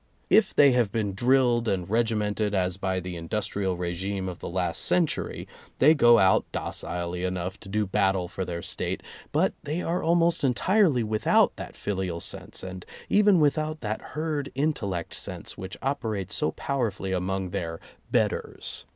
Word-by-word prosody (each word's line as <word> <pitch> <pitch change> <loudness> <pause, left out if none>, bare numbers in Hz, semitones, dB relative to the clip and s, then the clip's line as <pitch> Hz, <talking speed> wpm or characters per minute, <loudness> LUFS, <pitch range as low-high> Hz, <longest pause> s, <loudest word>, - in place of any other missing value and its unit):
If 215 -2 +4
they 140 -2 +7
have 120 -5 +2
been 105 -3 -1
drilled 120 +1 +3
and 90 -4 -1
regimented, 105 -2 0
as 90 -1 0
by 95 -1 -1
the 90 0 -6
industrial 95 +2 -2
regime 95 +2 -3
of 90 -2 -6
the - - -6
last 90 -1 -1
century, 170 -4 0 0.3
they 150 +4 +6
go 120 -6 +6
out 95 -3 +4
docilely 90 0 -3
enough 90 0 -3
to - - -12
do 105 +1 0
battle 95 -2 +1
for 95 +1 -4
their 85 -2 -5
State, - - -2 0.3
but - - +2
they 160 +5 -3
are 170 +2 -1
almost 170 0 +3
entirely 145 - +3
without 110 0 +3
that - - -8
filial 95 -4 -3
sense 95 +2 -3
and 95 -1 -7 0.3
even 205 -3 +5
without 155 +1 +1
that 110 -1 -3 0.2
herd 150 -3 -2
intellect 110 - -1
sense - - -5
which 95 0 -7
operates 110 -9 -2
so - - +1
powerfully 115 -8 -2
among 95 0 -2
their 80 -1 -3 0.3
"betters." - - -1
105 Hz, 160 wpm, -26 LUFS, 95-135 Hz, 0.3 s, they